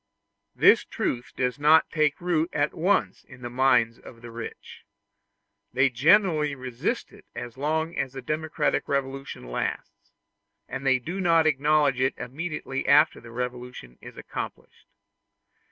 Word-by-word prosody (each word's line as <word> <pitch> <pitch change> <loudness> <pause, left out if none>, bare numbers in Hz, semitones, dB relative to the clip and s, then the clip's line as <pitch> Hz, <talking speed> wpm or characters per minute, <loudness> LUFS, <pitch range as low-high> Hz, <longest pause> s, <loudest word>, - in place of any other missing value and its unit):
This - - +6
truth 120 0 -3
does 125 +1 -1
not 155 +2 +5
take 155 -2 +1
root 175 -2 0
at 145 +1 0
once 190 +5 0
in 125 - -15
the 120 - -5
minds 120 -3 +2
of 115 -1 -14
the 120 - -9
rich. 115 0 -9 0.9
They 130 +1 +3
generally 155 - +3
resist 130 -2 -3
it - - -16
as 120 -1 -7
long 160 +4 -1
as 130 -1 -2
the 135 - -7
democratic 155 +3 -1
revolution 135 - -3
lasts, - - -4 0.6
and 135 - -5
they 130 -1 +5
do 170 +10 -5
not 165 -3 +4
acknowledge 145 -2 +2
it 130 0 +1
immediately 135 +1 -5
after 150 +3 +4
that 115 - -12
revolution 125 - -6
is - - -12
accomplished. - - -8
135 Hz, 140 wpm, -26 LUFS, 125-155 Hz, 0.9 s, This